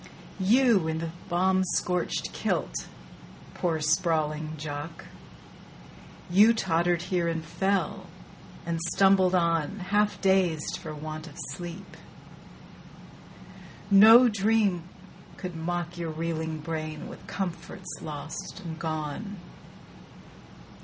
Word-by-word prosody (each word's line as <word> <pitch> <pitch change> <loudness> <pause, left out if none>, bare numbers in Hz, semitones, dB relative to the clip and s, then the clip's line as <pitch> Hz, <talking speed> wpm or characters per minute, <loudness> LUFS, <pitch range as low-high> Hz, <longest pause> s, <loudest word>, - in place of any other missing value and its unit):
You 215 -2 +4
in 160 0 -1
the 165 0 -4 0.2
bomb 185 +2 +2
scorched 180 0 -1
kilt, - - -2 0.7
poor 165 -3 -1
sprawling 155 -1 0
Jock, 150 +2 -6 1.2
You 210 +6 +6
tottered 175 -3 +1
here 175 -1 0
and 165 -1 -2
fell, 195 0 -1 0.6
and 165 -1 -2 0.2
stumbled 190 -1 +5
on, 170 +1 +1
Half 205 +2 +1
dazed 185 -5 +2
for 160 -4 -7
want 155 +1 -6
of 150 - -13
sleep. 175 +5 -8 2.0
No 225 +5 +9
dream 205 -5 +1 0.5
could 180 -2 -6
mock 175 +1 -3
Your 170 -1 -3
reeling 160 -1 -3
brain 155 -1 -5
with - - -11
comforts 185 0 -5
lost 155 +4 -6
and 165 -4 -7
gone. 160 +6 -4
175 Hz, 100 wpm, -27 LUFS, 160-190 Hz, 2.0 s, No